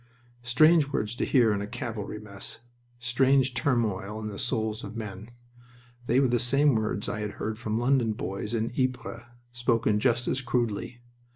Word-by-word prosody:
Strange 150 Hz, +6 st, +5 dB
words 105 Hz, -4 st, -1 dB
to -, -, -2 dB
hear 120 Hz, -6 st, +4 dB
in 100 Hz, -, -1 dB
a 100 Hz, -, -4 dB
cavalry 110 Hz, -3 st, -5 dB
mess! 100 Hz, -2 st, -8 dB, 0.4 s
Strange 130 Hz, +2 st, +2 dB
turmoil 110 Hz, -5 st, 0 dB
in 105 Hz, -1 st, -4 dB
the 100 Hz, -, -7 dB
souls 110 Hz, -3 st, -1 dB
of 100 Hz, +2 st, -7 dB
men! 105 Hz, -1 st, -6 dB, 0.8 s
They 125 Hz, -, +4 dB
were 135 Hz, -, +4 dB
the 120 Hz, -1 st, +2 dB
same 140 Hz, +4 st, +3 dB
words 110 Hz, -2 st, -1 dB
I 110 Hz, -, -3 dB
had 105 Hz, -1 st, -3 dB
heard 110 Hz, 0 st, -4 dB
from 110 Hz, -2 st, -2 dB
London 120 Hz, -2 st, +2 dB
boys 105 Hz, +2 st, -4 dB
in 115 Hz, 0 st, -1 dB
Ypres, 130 Hz, -2 st, -2 dB, 0.3 s
spoken 115 Hz, -3 st, +1 dB
just 120 Hz, +1 st, +1 dB
as 135 Hz, -, 0 dB
crudely. 120 Hz, -1 st, -2 dB
115 Hz, 170 wpm, -28 LUFS, 105-125 Hz, 0.8 s, Strange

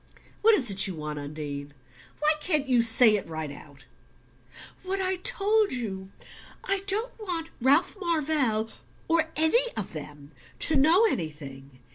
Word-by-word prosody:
"What 445 Hz, 0 st, +5 dB
is 250 Hz, -, +3 dB
it 195 Hz, +1 st, +3 dB
you 190 Hz, -, -6 dB
want, 150 Hz, -1 st, -6 dB
Undine? 145 Hz, -1 st, -8 dB, 0.5 s
Why 305 Hz, +1 st, +4 dB
can't 300 Hz, -3 st, -1 dB
you 250 Hz, -3 st, +3 dB
say 230 Hz, -1 st, +6 dB
it 190 Hz, -, -8 dB
right 160 Hz, -2 st, -6 dB
out?" 140 Hz, -2 st, -15 dB, 1.0 s
"What 380 Hz, +1 st, -3 dB
I 375 Hz, 0 st, 0 dB
told 425 Hz, 0 st, +1 dB
you. 195 Hz, -6 st, -6 dB, 0.5 s
I 395 Hz, 0 st, 0 dB
don't 430 Hz, +5 st, +1 dB
want 340 Hz, -6 st, -4 dB
Ralph 285 Hz, -, +3 dB
Marvell 295 Hz, -, 0 dB, 0.4 s
or 325 Hz, -1 st, +1 dB
any 470 Hz, +11 st, +3 dB
of 200 Hz, -, -5 dB
them 145 Hz, -1 st, -10 dB, 0.3 s
to 320 Hz, -, +2 dB
know 325 Hz, +10 st, +5 dB
anything. 140 Hz, -, -6 dB
255 Hz, 145 wpm, -26 LUFS, -, 1.0 s, say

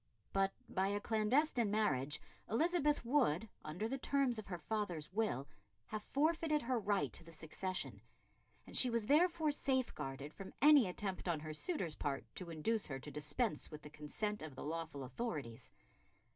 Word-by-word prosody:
But 195 Hz, 0 st, +3 dB, 0.2 s
by 190 Hz, +1 st, +1 dB
a 205 Hz, +1 st, 0 dB
clandestine 230 Hz, +3 st, +2 dB
marriage 150 Hz, -9 st, +1 dB, 0.3 s
Elizabeth 300 Hz, +2 st, +2 dB
would, 230 Hz, -, +3 dB, 0.2 s
under 170 Hz, +8 st, -3 dB
the 270 Hz, +3 st, -3 dB
terms 265 Hz, -4 st, +1 dB
of 215 Hz, -, -8 dB
her 180 Hz, -2 st, -3 dB
father's 175 Hz, -3 st, -3 dB
will, 190 Hz, -, 0 dB, 0.4 s
have 215 Hz, -1 st, -4 dB
forfeited 305 Hz, +3 st, +1 dB
her 250 Hz, 0 st, +1 dB
right 205 Hz, -1 st, +1 dB
to -, -, -7 dB
the 165 Hz, -, -13 dB
succession, 175 Hz, +4 st, -3 dB, 0.6 s
and -, -, -6 dB
she 255 Hz, -, +9 dB
was 230 Hz, -2 st, +1 dB
therefore 315 Hz, +3 st, +4 dB
safeguarded 195 Hz, -, -1 dB
from 195 Hz, -1 st, -9 dB
any 290 Hz, -6 st, +8 dB
attempt 190 Hz, +1 st, -3 dB
on 165 Hz, -3 st, 0 dB
her 155 Hz, 0 st, -5 dB
suitor's 175 Hz, -, -2 dB
part 140 Hz, -5 st, -2 dB
to 180 Hz, -, -5 dB
induce 200 Hz, +8 st, 0 dB
her 135 Hz, -, -3 dB
to 145 Hz, +2 st, -8 dB
dispense 150 Hz, -, -1 dB
with 150 Hz, -1 st, -9 dB
the 150 Hz, -, -9 dB
consent 155 Hz, +8 st, -3 dB
of 155 Hz, -3 st, -7 dB
the -, -, -6 dB
lawful 160 Hz, -2 st, -4 dB
authorities. 130 Hz, -, -4 dB
205 Hz, 165 wpm, -38 LUFS, 155-245 Hz, 0.6 s, she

